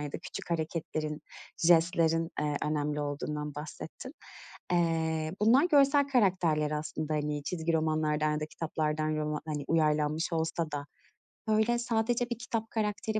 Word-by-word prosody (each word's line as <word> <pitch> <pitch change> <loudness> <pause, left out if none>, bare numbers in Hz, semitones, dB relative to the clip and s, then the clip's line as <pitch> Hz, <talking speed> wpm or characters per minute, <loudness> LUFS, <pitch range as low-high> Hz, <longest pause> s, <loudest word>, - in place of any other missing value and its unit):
ya 145 -1 -5
da - - -3
küçük 170 - -8
hareketlerin, 155 -2 -2 0.4
jestlerin, 165 -1 +3
eee, 150 -1 0
önemli 150 0 -1
olduğundan 150 0 -3
bahsettin. 155 - -8 0.6
Eee, 160 -2 +1
bunlar 240 +8 +5
görsel 280 0 +5
karakterler 180 - +2
aslında, 155 0 -3
hani, 150 -1 -1
çizgi 165 0 -1
romanlardan 155 -1 +1
ya 150 - -1
da 155 - -2
kitaplardan 155 -1 -2
roma 150 0 -2
hani, 150 -2 -3
uyarlanmış 155 +1 +1
olsa 160 0 -1
da, 145 -1 -4 0.6
böyle, 220 +2 +3
sadece 240 +1 0
bir 240 - -2
kitap 230 -2 -3
karakteri 215 0 -1
160 Hz, 135 wpm, -30 LUFS, 150-200 Hz, 0.6 s, bunlar